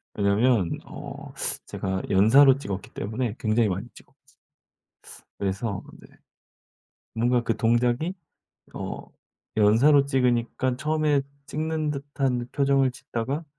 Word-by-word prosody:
왜냐면 100 -1 +2
어 - - -9 0.3
제가 95 0 -3
연사로 130 +8 +6
찍었기 100 -8 -6
때문에 110 +2 -3
굉장히 110 0 +2
많이 95 +5 -3
찍었 130 - -18 1.3
그래서 100 +1 -2 0.2
네 - - -15 1.1
뭔가 120 +1 +1
그 115 - 0
동작이 120 - +1 0.6
어 - - -5 0.6
연사로 120 +8 +5
찍으니까 125 -1 +1
처음에 150 0 +1 0.2
찍는 155 0 -2
듯한 135 -3 -2
표정을 135 -2 +2
짓다가 125 +5 -4
125 Hz, 235 characters per minute, -25 LUFS, 110-140 Hz, 1.3 s, 연사로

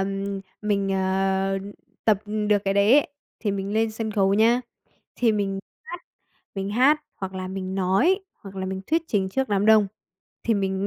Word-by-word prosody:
ừm, 195 0 -2 0.2
mình, 200 -2 0
ờ, 190 0 +1 0.5
tập 215 -3 +4 0.3
được 210 - +4
cái 195 0 +1
đấy 200 +4 +4
ấy, - - +1 0.3
thì 210 - -1
mình 195 0 -3
lên 225 0 +2
sân 220 0 -4
khấu 195 -2 +2
nhá, 230 +4 +4 0.6
thì 235 -3 +3
mình 200 -2 -1 0.3
hát, 355 -7 -7 0.5
mình 195 0 -3
hát, 265 +8 +4 0.2
hoặc 190 -1 -6
là 185 0 -4
mình 190 0 -4
nói, 195 - +2 0.2
hoặc 195 -1 -10
là 190 - -3
mình 190 0 -4
thuyết 325 +1 +1
trình 195 -3 +1
trước 265 +6 -1
đám 205 0 +1
đông 220 -2 +6 0.6
thì 230 - +2
mình 195 0 -1
200 Hz, 180 wpm, -24 LUFS, 195-220 Hz, 0.6 s, đông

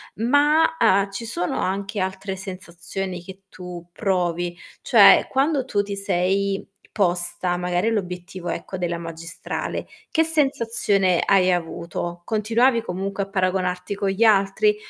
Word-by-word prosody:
Ma, 290 +8 +3
uhm, 200 -3 +3
ci 195 +4 -6
sono 180 -6 -2
anche 200 +2 -2
altre 190 +1 -3
sensazioni 185 -1 -6
che 190 +1 -12
tu 180 -2 -9
provi? 175 -3 -1 0.2
Cioè, - - +7
quando 275 +1 +1
tu 205 -5 0
ti 200 0 -5
sei 195 0 0 0.3
posta 180 -2 0
magari 180 +3 0
l'obiettivo, 180 -3 -4
ecco, 190 - -5
della 175 -1 -2
magistrale, 165 0 -5 0.2
che 320 - +3
sensazione 230 - +2
hai 185 -2 +4
avuto? 175 0 -4
Continuavi 230 +3 +2
comunque 195 -1 -3
a 195 - -9
paragonarti 185 0 -1
con 200 0 -1
gli 195 +4 +1
altri? 215 - +3
195 Hz, 130 wpm, -23 LUFS, 180-215 Hz, 0.3 s, Cioè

